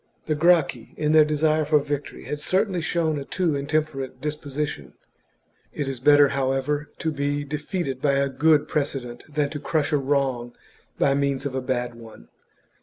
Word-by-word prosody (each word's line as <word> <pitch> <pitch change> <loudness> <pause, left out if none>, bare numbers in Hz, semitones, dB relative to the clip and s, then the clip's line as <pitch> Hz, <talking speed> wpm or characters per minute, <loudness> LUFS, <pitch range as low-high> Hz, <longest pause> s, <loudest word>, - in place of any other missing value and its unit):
The 155 - 0
Gracchi, 155 -6 +2
in 150 0 +1
their 155 0 +7
desire 155 +1 +2
for 150 0 +3
victory, 145 0 -4
had 150 - -4
certainly 185 +3 0
shown 160 -2 0
a - - -5
too 165 +1 -1
intemperate 140 -2 -2
disposition. 145 - -4 0.8
It 145 - -3
is 135 -2 -4
better, 145 +1 +6
however, 135 +2 -1
to 160 - -1
be 145 0 -1
defeated 150 -1 -3
by 145 -1 +2
a 140 0 +2
good 145 +3 +3
precedent 135 -5 -3
than 145 -1 0
to 150 - -4
crush 155 +1 0
a 150 - +3
wrong 135 -3 -1 0.4
by 135 - +3
means 140 0 0
of 140 - -2
a 130 - -1
bad 125 -1 -2
one. 115 - -14
145 Hz, 170 wpm, -24 LUFS, 135-155 Hz, 0.8 s, their